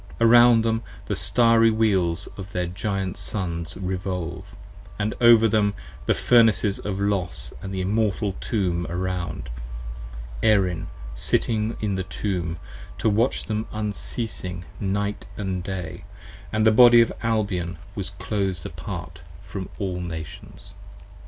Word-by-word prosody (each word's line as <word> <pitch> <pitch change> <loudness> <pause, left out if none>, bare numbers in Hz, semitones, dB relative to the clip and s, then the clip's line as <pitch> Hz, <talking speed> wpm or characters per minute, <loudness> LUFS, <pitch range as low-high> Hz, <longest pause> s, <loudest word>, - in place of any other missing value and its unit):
Around 120 0 +7
them 115 0 +1 0.2
the - - -2
Starry 115 -1 +5
Wheels 95 -5 +2
of 95 0 -9
their 90 0 0
Giant 95 +1 -3
Sons 85 -4 -4
Revolve: 90 -2 -4 0.4
& 105 +3 -4
over 115 -1 +7
them 105 -1 +2 0.3
the - - +3
Furnaces 115 -4 +4
of 100 -1 -3
Los 90 -12 -1
& - - -16
the 95 -1 -3
Immortal 105 0 0
Tomb 90 -5 -1
around: 90 -6 -3 0.9
Erin 95 -6 +2 0.3
sitting 110 - 0
in 105 -2 0
the 95 -1 -1
Tomb, 90 -3 -3 0.4
to 110 - +2
watch 115 +5 +1
them 110 0 -2
unceasing 105 -3 -3
night 100 +1 -2
and 95 -3 -2
day: 90 -3 -5 0.5
And 110 0 +1
the 110 - +7
Body 120 +1 +8
of 115 - +2
Albion 100 -7 -1 0.2
was - - -4
closed 95 -6 -3
apart 80 -1 -7 0.2
from 95 -1 -6
all 95 -3 -2
Nations. 80 -3 -7
100 Hz, 125 wpm, -24 LUFS, 90-110 Hz, 0.9 s, Body